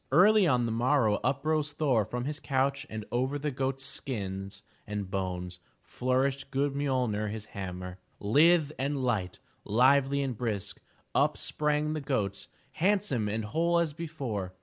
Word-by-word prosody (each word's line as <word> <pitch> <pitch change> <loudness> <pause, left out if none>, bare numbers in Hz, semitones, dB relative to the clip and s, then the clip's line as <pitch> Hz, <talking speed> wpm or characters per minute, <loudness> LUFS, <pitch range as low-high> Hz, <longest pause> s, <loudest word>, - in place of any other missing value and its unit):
Early 195 +6 +6
on 125 -5 +3
the 115 - -1
morrow 115 -2 +2
up 140 +2 0
rose 155 -2 +1
Thor 130 -9 +2
from 125 +3 -4
his 150 +1 -3
couch 135 +1 0
and 110 -1 -5
over 130 +4 0
the 150 +1 -2
goats' 135 0 -2
skins 100 -8 -4 0.2
and 105 -2 -4
bones 90 -2 -3 0.2
flourished 130 +2 0
good 140 +1 0
MjoPner, 125 -7 0
his 110 0 -5
hammer. 90 -1 -6 0.2
Lithe 150 +8 +4
and 140 0 -1
light, 105 -8 -1 0.3
lively 135 +5 +3
and 130 -3 -2
brisk, 105 -4 -3 0.3
up - - +2
sprang 150 0 0
the 155 - -3
goats, 105 -9 -2 0.2
handsome 180 - +1
and 110 +1 -2
whole 165 +9 +1
as 165 -3 +1
before. 135 - -4
130 Hz, 150 wpm, -29 LUFS, 105-145 Hz, 0.3 s, Early